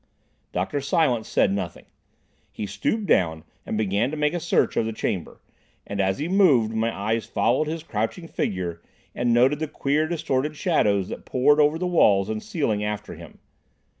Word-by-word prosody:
Dr. 95 +11 -2
Silence 135 -5 +1
said 95 - +2
nothing. 95 -4 -4 0.7
He 105 - -5
stooped 200 - -2
down 80 - +2 0.2
and 110 - -2
began 105 +3 +1
to 155 - -5
make 150 +1 +1
a 175 - -1
search - - +1
of 110 - +1
the 115 - -3
chamber, 95 -4 -4 0.4
and 100 0 -2
as 95 0 +1
he 150 - -3
moved, 150 - +4
my 110 +1 0
eyes 110 +2 -2
followed 155 - +1
his 160 0 -4
crouching 115 - -3
figure 90 - -3 0.3
and 120 0 0
noted 130 +5 +4
the 155 - -2
queer 150 +2 0
distorted 150 -3 -1
shadows 105 - +1
that - - -7
poured 145 +4 +3
over 150 +1 +4
the 180 - -2
walls 105 - +3
and 110 0 -3
ceiling 110 -11 -1
after 105 0 -4
him. - - -12
120 Hz, 175 wpm, -24 LUFS, 105-150 Hz, 0.7 s, moved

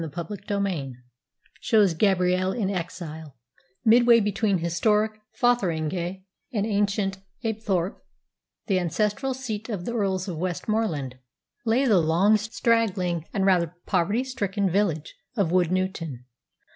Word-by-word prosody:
CHAPTER 165 +6 -5
XXV 195 - -2 0.6
SHOWS 200 +2 +3
GABRIELLE 185 0 +2
IN 205 -5 -1
EXILE 160 -5 -6 0.5
Midway 235 +1 +6
between 205 -1 +1
historic 210 +6 +1 0.3
Fotheringhay 185 -5 0 0.3
and 210 -5 0
ancient 200 -2 0 0.3
Apethorpe, 205 -5 -1 0.6
the 195 -4 +2
ancestral 210 - -1
seat 220 -4 -5
of 195 -6 -4
the 235 - -3
Earls 195 -4 -1
of 170 -4 -4
Westmorland, 175 - -2 0.5
lay 240 +4 +3
the 210 -8 +5
long, 170 +6 +4
straggling, 210 -6 0
and 195 -2 0
rather 175 -3 +2
poverty 200 +6 +1
stricken 200 -7 -1
village 170 -6 0 0.2
of 190 -6 +1
Woodnewton. 180 -6 0
195 Hz, 115 wpm, -25 LUFS, 175-215 Hz, 0.6 s, Midway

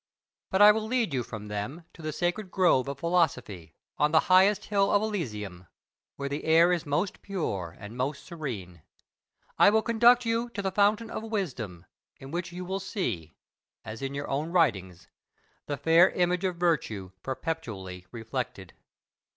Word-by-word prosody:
But 190 +2 +4
I 210 - +10
will 215 0 -2
lead 230 - 0
you 130 - +1
from 110 -3 -7
them 105 +11 -5
to - - -13
the 155 0 -3
sacred 175 +5 -2
grove 175 -9 +3
of 140 -1 -4
philosophy, 140 - -1 0.2
on 150 0 +3
the 160 - +5
highest 190 +3 +5
hill 200 -1 +2
of 205 - +4
Elysium, 105 - -4 0.5
where 140 - -4
the 145 +2 -4
air 165 +2 +5
is 170 -4 -2
most 160 +7 -1
pure 100 - -4
and 105 +3 -9
most 135 +3 -3
serene. 110 - -6 0.8
I - - +8
will 220 +1 +3
conduct 235 +1 +5
you 230 +1 0
to 200 - -3
the 190 - 0
fountain 210 +3 +2
of - - -4
wisdom, 130 - -4 0.3
in 135 +1 -11
which 175 +1 -3
you 180 +1 -6
will 190 +2 -2
see, 115 - -4 0.5
as 110 0 -7
in 135 0 -4
your 140 +1 -4
own 145 +4 -2
writings, 95 - +1 0.6
the 145 - -2
fair 165 +4 +5
image 180 +1 0
of 185 -2 0
virtue 145 - -1
perpetually 110 - -5
reflected. 115 - -5
160 Hz, 165 wpm, -28 LUFS, -, 0.8 s, I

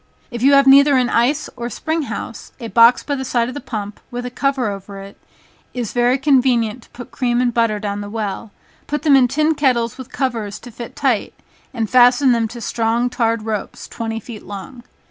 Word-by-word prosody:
If 235 -1 -6
you 275 +2 +5
have 275 0 +6
neither 280 +1 +6
an 250 -1 +1
ice, 270 +6 +1
or 235 0 -5
spring 320 +5 -2
house, - - -7
a 230 -2 -6
box 235 +2 +5
by 290 - -3
the 265 -1 -3
side 240 -2 0
of - - -6
the 290 - -6
pump, 210 -3 -6
with 245 0 -5
a 250 - -5
cover 270 -2 0
over 200 0 -6
it, 195 +1 -11 0.6
is 240 -4 -4
very 245 +1 +2
convenient 255 -5 +2
to - - -21
put 245 -1 -11
cream 240 -2 0
and 245 -1 +1
butter 230 -2 +1
down 205 -1 -4
the 205 - -7
well, 210 0 -4 0.4
put 295 0 -3
them 295 -3 +5
in 260 -2 +5
tin 305 +5 +1
kettles 250 -5 0
with 260 - -9
covers 230 -7 -3
to 245 - -11
fit 235 +1 -9
tight, 255 -7 -1 0.4
and 230 -4 -2
fasten 250 +3 +5
them 230 -2 +1
to 235 +2 -9
strong 235 +2 0
tarred 230 -3 0
ropes 215 -2 -5
twenty 225 -1 -4
feet 225 -1 -10
long. 205 +5 -9
240 Hz, 210 wpm, -19 LUFS, 225-265 Hz, 0.6 s, have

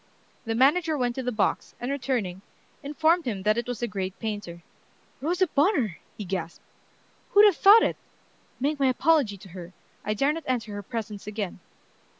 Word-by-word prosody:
The 225 0 -2
manager 305 +6 +3
went 245 -2 0
to 260 - -4
the 250 -1 -2
box, 215 -3 -1
and 245 +3 -3
returning, 245 -10 -2 0.4
informed 315 +4 +1
him 205 -6 -3
that 215 +1 +3
it 235 0 -3
was 245 -2 -4
the 240 - 0
great 190 -3 -4
painter. 205 -6 -5 0.6
"Rosa 350 +6 +1
Bonheur!" 285 - +1 0.2
he 210 - -6
gasped. 175 -3 -5 0.7
"Who'd 410 0 +8
have 405 -4 +5
thought 420 +3 +8
it? - - 0 0.6
Make 285 +3 -1
my 270 - +3
apology 260 -5 +2
to 190 - -14
her. 175 0 -10 0.3
I 210 - -1
dare 275 +7 +2
not 330 - -5
enter 230 -4 -2
her 205 - -5
presence 210 -1 -6
again." 205 -4 -4
240 Hz, 175 wpm, -26 LUFS, 205-295 Hz, 0.7 s, Who'd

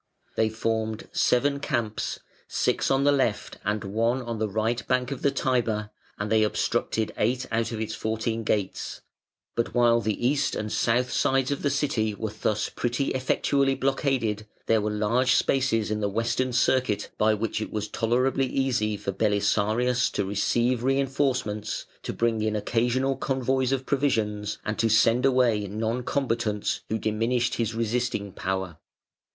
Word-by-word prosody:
They 110 0 +2
formed 110 0 -2
seven 140 +3 +2
camps 115 -6 -2 0.3
six - - 0
on 135 0 +3
the 145 - +5
left 120 -7 0
and 105 0 -1
one 115 +5 0
on 115 -2 -4
the 110 -1 0
right 110 +4 -1
bank 125 +1 +1
of 135 - -4
the 140 - +3
Tiber, 115 -6 0 0.3
and 105 +1 -3
they 110 0 +4
obstructed 110 +1 0
eight 125 +4 +1
out 115 0 0
of 115 - -4
its 110 0 -3
four 110 0 -2
teen 115 0 -2
gates; 100 -3 -2 0.5
but 115 0 -2
while 120 -1 +4
the 110 +2 0
east 145 +1 +1
and 105 0 -3
south 120 +2 +1
sides 135 0 +1
of 140 - -2
the 145 - +1
City 130 -7 0
were 110 0 -4
thus 105 0 -1
pretty 120 +3 -1
effectually 135 +1 +1
blockaded, 130 -6 0 0.2
there 110 -1 +3
were 105 - -1
large 110 +5 +2
spaces 115 -6 +1
in 105 - 0
the 105 -1 0
western 115 +4 0
circuit 125 -4 +1
by 110 0 +4
which 110 +1 -2
it - - -4
was 105 -1 -2
tolerably 125 +5 +1
easy 125 -6 0
for 100 - -3
Belisarius 110 +4 +1
to 100 - 0
receive 120 +5 +1
reinforcements, 130 -5 0 0.2
to - - -4
bring 115 -2 0
in 110 0 0
occasional 125 +5 +1
convoys 130 -1 0
of 130 -1 -1
provisions, 110 -7 0
and 105 - -3
to 115 - +3
send 115 +4 +4
away 120 -6 +2
non 110 +4 -2
combatants 115 -6 -1
who 110 - 0
diminished 115 +3 0
his 115 -1 -1
resisting 115 -3 -1
power. 95 -3 -3
115 Hz, 160 wpm, -26 LUFS, 105-130 Hz, 0.5 s, the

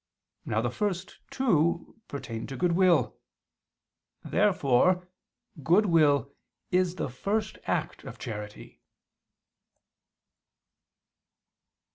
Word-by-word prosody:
Now 110 - 0
the 120 0 -1
first 190 +1 -3
two 175 - 0
pertain 115 -5 -6
to 135 - -6
goodwill. 180 -1 +2 1.1
Therefore 180 -2 +2 0.5
goodwill 155 -5 +3 0.4
is 180 -1 +2
the - - -2
first 205 - -2
act - - -2
of - - -9
charity. 105 -1 -8
170 Hz, 75 wpm, -28 LUFS, 135-185 Hz, 1.1 s, goodwill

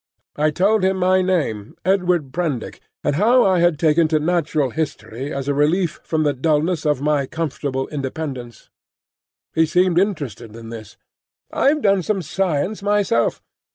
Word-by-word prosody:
I 155 +1 +2
told 195 +6 +2
him 190 0 +2
my 185 0 +3
name, 145 - -1
Edward 180 -7 +1
Prendick, 155 -9 -3 0.2
and 145 0 0
how 240 +6 +4
I 190 -2 +3
had 175 -2 +3
taken 160 +1 +3
to 155 0 +1
Natural 155 -4 0
History 140 -3 -4
as 135 0 -4
a 145 - +1
relief 155 +4 +1
from 160 -1 0
the 145 -1 +1
dulness 155 +3 0
of 150 -3 +1
my 145 -2 +1
comfortable 140 -4 -3
independence. 135 -4 -6 0.8
He 160 0 +3
seemed 180 +1 +3
interested 140 - -3
in 115 -1 -10
this. 110 -3 -10 0.6
"I've 290 +1 +2
done 200 -2 +3
some 195 +1 -1
science 185 +4 -1
myself. 205 - +1
160 Hz, 155 wpm, -20 LUFS, 140-185 Hz, 0.8 s, how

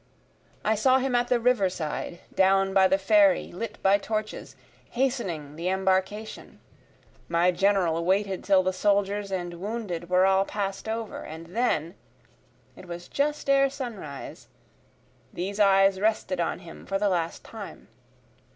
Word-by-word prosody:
I 220 - +3
saw 255 +5 +4
him 265 -1 -1
at 245 0 +2
the 245 -1 +2
river 235 -5 +2
side, 170 0 -5
Down 195 0 +3
by 190 -1 +5
the 190 +1 +2
ferry 295 +8 +3
lit 210 +4 -6
by 195 +1 +4
torches, 215 +1 -4 0.3
hastening 195 - -2
the 170 +2 -2
embarcation; 190 +3 -2 0.7
My 170 +2 +3
General 180 -3 +1
waited 195 +1 0
till 190 -2 +4
the 185 0 0
soldiers 200 +1 0
and 175 -2 -4
wounded 195 -5 -4
were 180 +1 +4
all 190 0 +4
pass'd 195 +1 -4
over, 225 0 -4
And 165 +3 -10
then, 175 -9 0 0.8
(it 185 - -13
was 175 0 -7
just 295 +1 -1
ere 275 0 +4
sunrise,) 225 - -8 0.8
these 195 +4 -4
eyes 195 -1 +4
rested 210 -3 0
on 170 - -1
him 170 -2 -12
for 195 - 0
the 205 +1 +1
last 170 -4 -1
time. 210 - -10
195 Hz, 145 wpm, -26 LUFS, 180-220 Hz, 0.8 s, by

